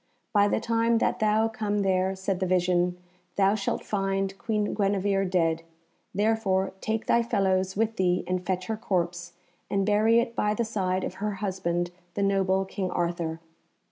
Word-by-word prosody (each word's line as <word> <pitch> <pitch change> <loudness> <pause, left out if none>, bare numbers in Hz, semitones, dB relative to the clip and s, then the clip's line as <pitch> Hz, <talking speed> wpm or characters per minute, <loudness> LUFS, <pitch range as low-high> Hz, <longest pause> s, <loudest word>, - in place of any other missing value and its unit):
"By 205 -1 +5
the - - +1
time 230 0 +2
that - - 0
thou 215 +1 +3
come 210 -2 -1
there," 190 0 +1
said 190 -1 -2
the 190 - 0
vision, 180 0 +2 0.4
"thou 195 0 +4
shalt 205 -2 -2
find 195 -1 -1
Queen 210 -2 -1
Guenevere 195 -1 +1
dead; 165 -3 +1 0.5
therefore 200 -3 +1
take 220 0 -2
thy 235 - +3
fellows 190 -4 0
with 225 0 0
thee 180 -1 +2
and 180 0 -2
fetch 185 0 -2
her 220 +2 -3
corpse, 175 -5 -2 0.4
and 195 -1 +1
bury 215 +3 +4
it 235 0 -2
by 210 -1 +1
the 235 - 0
side 190 -4 -1
of - - -3
her 210 0 -1
husband, 180 -3 -2 0.2
the 200 - 0
noble 195 -1 +2
King 190 -1 -3
Arthur." 170 -2 -2
195 Hz, 170 wpm, -27 LUFS, 185-215 Hz, 0.5 s, By